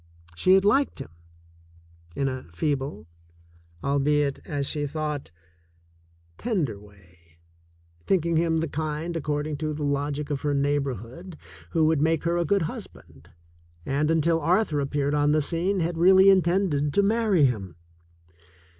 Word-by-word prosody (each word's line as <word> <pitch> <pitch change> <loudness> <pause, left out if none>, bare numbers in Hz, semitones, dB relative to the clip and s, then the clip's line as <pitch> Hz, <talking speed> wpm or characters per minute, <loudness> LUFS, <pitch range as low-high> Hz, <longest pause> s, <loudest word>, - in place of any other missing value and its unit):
She 185 - +3
had 195 +1 +3
liked 270 +7 +2
him 135 - -8 1.0
in 135 - 0
a 130 -1 -4
feeble, 135 - -2 0.8
albeit, 140 0 +1
as 145 -4 -2
she 145 +1 -2
thought, 150 - -4 1.1
tender 165 - -2
way, 85 -5 -21 0.7
thinking 170 -3 +1
him 165 0 +2
the 165 +1 -1
kind, 155 +3 -4
accord 150 -2 -2
ing 155 -1 -4
to 155 0 -3
the 150 - -4
logic 145 +1 -2
of 140 - -2
her 145 -1 0
neighborhood, 140 - -3 0.3
who 160 -1 +2
would 155 -2 +2
make 160 0 +1
her 170 +1 0
a 170 - 0
good 200 +2 +2
husband, - - -9 0.6
and, 145 +3 0
until 165 0 +2
Arthur 165 0 +1
appeared 140 +1 -1
on 145 0 +2
the 155 - +3
scene, 180 +5 -1
had 165 0 -2
really 190 +2 +7
intended 175 -6 +1
to 200 - +4
marry 210 -6 +3
him. 100 - -2
150 Hz, 145 wpm, -25 LUFS, 140-170 Hz, 1.1 s, really